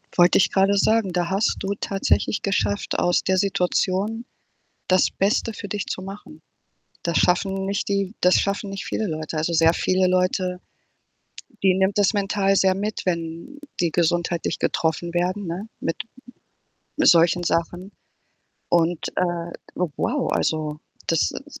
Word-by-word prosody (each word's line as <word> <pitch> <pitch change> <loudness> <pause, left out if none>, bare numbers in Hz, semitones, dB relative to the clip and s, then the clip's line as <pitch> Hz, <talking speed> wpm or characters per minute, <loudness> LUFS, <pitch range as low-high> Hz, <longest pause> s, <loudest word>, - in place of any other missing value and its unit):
Wollte 175 0 +5
ich - - +3
grade 195 +1 +3
sagen, 215 -1 +2
da 175 -1 -1
hast 195 +3 +1
du 200 +1 -2
tatsächlich 195 +1 0
geschafft, 205 0 -1
aus 175 0 +2
der 190 0 +1
Situation 195 +4 0 0.6
das 185 0 +3
Beste 210 +3 0
für 205 -1 -8
dich 205 0 -3
zu 185 - -4
machen. 190 - -10 0.6
Das 170 -1 0
schaffen 190 +2 +1
nicht 200 +1 -2
die 200 0 -1
das 180 +1 +5
schaffen 200 0 -2
nicht 195 0 -5
viele 220 - -2
Leute. 155 -1 -4
Also, 160 +2 -1
sehr 165 0 +4
viele 185 +1 +1
Leute 185 0 0 1.1
die 190 -1 +5
nimmt 190 +2 +1
das 205 +1 +3
mental 195 -1 +1
sehr 190 -1 +3
mit, 205 +2 -3
wenn 170 - -4 0.2
die 170 -2 +1
gesundheitlich 170 0 0
getroffen 165 +1 -1
werden, 185 +3 -1
ne, 180 +6 -5
mit 165 - -2 1.0
solchen 170 +1 +5
Sachen 175 +3 -2 0.8
und, 170 -1 +1
äh, 170 -1 -1 0.2
wow, 175 -5 -1
also, 155 -1 -1 0.3
das 165 - +2
ist - - -10
185 Hz, 145 wpm, -23 LUFS, 170-195 Hz, 1.1 s, Wollte